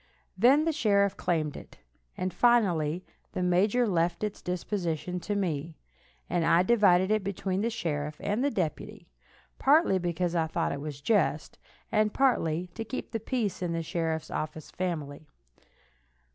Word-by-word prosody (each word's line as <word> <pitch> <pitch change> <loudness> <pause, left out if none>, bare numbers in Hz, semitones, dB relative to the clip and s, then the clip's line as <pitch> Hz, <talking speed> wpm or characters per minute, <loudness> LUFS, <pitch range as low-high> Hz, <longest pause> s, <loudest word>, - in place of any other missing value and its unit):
Then 265 +10 +5
the 325 - +2
sheriff 200 -9 +2
claimed 155 -4 -1
it, - - -11 0.4
and 185 0 -2
finally 185 -9 +2 0.3
the 180 - -1
major 200 +7 +3
left 170 -1 0
its 210 -1 -3
disposition 180 -1 -3
to 205 +4 -3
me, 165 -5 -2 0.5
and 175 -1 0
I 170 +2 +4
divided 190 -3 +4
it 215 -2 +2
between 195 0 -2
the 230 - +1
sheriff 150 -9 -3
and 210 +5 -1
the 285 - +3
deputy, 180 - -4 0.5
partly 280 - +4
because 175 0 -1
I 165 -2 +1
thought 160 - -1
it 140 0 -5
just, 190 -6 +1 0.3
and 215 -1 +2
partly 180 - +2
to 225 - -4
keep 225 +3 -6
the 225 - -2
peace 220 -4 -2
in 175 -2 -1
the 165 0 -2
sheriff's 165 -1 -2
official 155 0 -5
family. 155 -5 -4
180 Hz, 150 wpm, -28 LUFS, 165-215 Hz, 0.5 s, Then